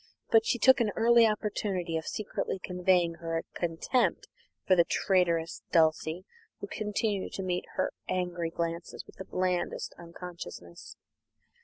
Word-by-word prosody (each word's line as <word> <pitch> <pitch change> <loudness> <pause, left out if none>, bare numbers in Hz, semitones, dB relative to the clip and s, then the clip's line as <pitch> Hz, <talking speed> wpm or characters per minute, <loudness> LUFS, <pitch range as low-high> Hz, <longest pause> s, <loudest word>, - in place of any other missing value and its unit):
But 225 -1 +5
she - - +2
took 260 +3 +6
an 220 - +2
early 235 0 +6
opportunity 200 -5 -2
of 160 - -3
secretly 215 -2 -3
conveying 180 -2 +1
her 165 0 -2
contempt 175 +9 0 0.4
for 185 - +5
the 170 - +6
traitress 170 -2 +1
Dulcie, 160 +2 +2 0.3
who - - -5
continued 210 -1 -2
to 195 - -4
meet 180 -1 -1
her - - 0 0.2
angry 175 -2 -1
glances 170 +1 -4
with - - -17
the 190 - -7
blandest 180 -1 -1
unconsciousness. 170 - -9
180 Hz, 135 wpm, -30 LUFS, 170-205 Hz, 0.4 s, took